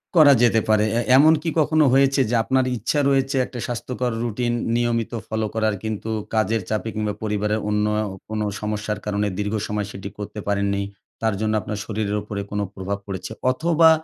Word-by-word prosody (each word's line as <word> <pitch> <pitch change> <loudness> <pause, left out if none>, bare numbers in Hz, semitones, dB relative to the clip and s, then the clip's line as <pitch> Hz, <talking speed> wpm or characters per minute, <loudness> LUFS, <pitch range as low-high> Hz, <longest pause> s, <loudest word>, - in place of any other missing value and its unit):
করা 150 -4 +8
যেতে 115 -2 +5
পারে। 110 0 +4
এ - - +3 0.2
এমন 155 +3 +7
কি 165 - 0
কখনো 155 0 +4
হয়েছে 135 0 +4
যে 120 - +1
আপনার 130 +1 +2
ইচ্ছা 120 +7 0
রয়েছে 135 0 +1
একটা 120 - -8
স্বাস্থ্যকর 125 0 -3
রুটিন 120 +1 -1 0.2
নিয়মিত 120 -1 0 0.2
ফলো 110 0 -1
করার 110 -2 +1
কিন্তু 110 0 -4 0.2
কাজের 110 0 +1
চাপে 110 +1 -1
কিংবা 105 -1 -1
পরিবারের 105 0 0
অন্য 105 0 +1 0.4
কোনো 110 -1 -1 0.2
সমস্যার 105 0 -2
কারণে 105 0 0
দীর্ঘ 105 +1 -1
সময় 105 -1 -2
সেটি 100 0 -7
করতে 105 +1 -6
পারেননি? 100 0 0 0.4
তার 110 -2 +1
জন্য 110 0 +1
আপনার 105 - -4
শরীরের 105 -1 -2
উপরে 105 -1 -4
কোনো 105 0 -1
প্রভাব 100 +1 -3
পড়েছে? 95 +1 -5 0.2
অথবা 165 +4 +4
110 Hz, 175 wpm, -23 LUFS, 105-125 Hz, 0.4 s, করা